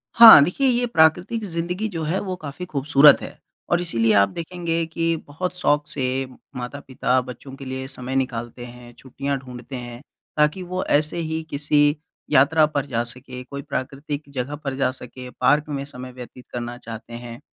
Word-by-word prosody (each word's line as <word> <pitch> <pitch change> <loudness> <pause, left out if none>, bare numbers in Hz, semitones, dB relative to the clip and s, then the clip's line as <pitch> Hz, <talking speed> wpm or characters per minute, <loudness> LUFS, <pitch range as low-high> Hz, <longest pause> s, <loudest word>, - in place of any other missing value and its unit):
हाँ, 230 -10 +12
देखिए, 265 - +1
ये 245 -1 +2
प्राकृतिक 180 +5 +3
ज़िंदगी 180 +4 -2
जो 165 -4 -4
है 170 +5 0
वो 185 -2 -3
काफ़ी 155 +2 -7
खूबसूरत 145 -1 +5
है, - - -8 0.3
और 175 0 +2
इसीलिए 115 -10 +2
आप 100 -1 +5
देखेंगे 170 -1 -3
कि 165 +1 -1
बहुत 180 +6 -4
शौक़ 150 -4 +1
से 135 -2 -1 0.3
माता-पिता 130 0 -1
बच्चों 125 +2 -10
के 135 0 -10
लिए 130 0 -5
समय 130 -1 -5
निकालते 120 -2 -3
हैं, 120 0 -12
छुट्टियाँ 135 +3 -4
ढूँढते 125 0 -9
हैं, 120 -1 -7 0.4
ताकि 150 +5 +2
वो 185 +1 -3
ऐसे 155 +3 +1
ही 160 -1 -2
किसी 145 +1 +2 0.4
यात्रा 150 +4 +5
पर 145 -2 -2
जा 120 -4 -1
सके, 125 +1 -6
कोई 140 +2 -7
प्राकृतिक 140 +1 -4
जगह 140 +1 -4
पर 135 -2 -2
जा 130 -1 +1
सके, 125 0 -10
पार्क 150 +4 +2
में 140 -2 -3
समय 130 -2 -9
व्यतीत 125 0 -11
करना 120 0 -4
चाहते 115 -1 -9
हैं, 120 0 -8
140 Hz, 175 wpm, -23 LUFS, 125-160 Hz, 0.4 s, हाँ